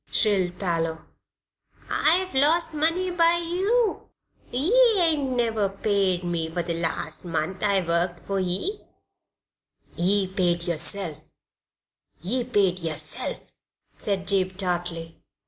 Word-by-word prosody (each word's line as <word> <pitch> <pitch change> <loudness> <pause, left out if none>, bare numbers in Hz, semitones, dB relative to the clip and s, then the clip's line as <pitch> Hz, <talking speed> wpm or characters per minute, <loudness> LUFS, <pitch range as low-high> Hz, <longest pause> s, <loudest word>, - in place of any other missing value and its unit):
shrilled 190 -5 +2
Parloe. 165 -3 -2 0.8
"I've 365 +4 +2
lost 310 +5 +3
money 330 +5 +1
by 340 -1 +3
you; 385 +7 0 0.4
ye 280 - 0 0.2
ain't 315 -6 +2
never 225 -4 +1
paid 195 -2 0
me 170 -2 -2
for 170 +1 -2
the 170 0 -1
last 165 -1 -3
month 170 +1 -3
I 200 -3 +2
worked 170 +1 -1
for 195 -1 -1
ye." 190 - -1 1.2
"Ye 195 +3 +2
paid 180 -3 0
yerself 170 -1 0 1.0
ye 240 +9 -1
paid 200 -7 +1
yerself," 165 -3 -5 0.4
said 195 -2 -2
Jabe, 190 -1 +1
tartly. 175 -3 -3
195 Hz, 110 wpm, -25 LUFS, 175-275 Hz, 1.2 s, lost